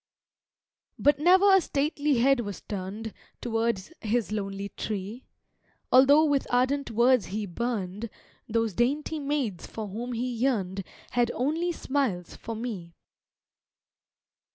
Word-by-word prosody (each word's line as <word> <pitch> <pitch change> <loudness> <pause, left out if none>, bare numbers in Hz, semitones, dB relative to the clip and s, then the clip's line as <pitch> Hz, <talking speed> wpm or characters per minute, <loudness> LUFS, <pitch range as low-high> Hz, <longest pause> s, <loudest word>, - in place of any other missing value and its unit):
But 290 0 +3
ne'er 375 +5 +6
a 385 - +5
stately 295 -1 0
head 270 +2 +4
was 205 -5 -5
turned 205 +3 -5 0.3
Towards 230 - -1
his 225 0 0
lonely 200 -1 -3
tree, 210 +5 -5 0.7
Altho' 280 +5 +7
with 285 -3 +1
ardent 260 +3 +1
words 240 +1 +3
he 210 +3 -3
burned, 210 +1 -3 0.4
Those 225 -1 0
dainty 290 - 0
maids 275 -10 -2
for 220 -2 -6
whom 240 +5 -5
he 240 +2 -2
yearn'd 225 -6 -1 0.3
Had 240 -1 +2
only 320 +7 0
smiles 260 - -2
for 230 - -6
me. 205 -8 -6
235 Hz, 120 wpm, -27 LUFS, 205-275 Hz, 0.7 s, Altho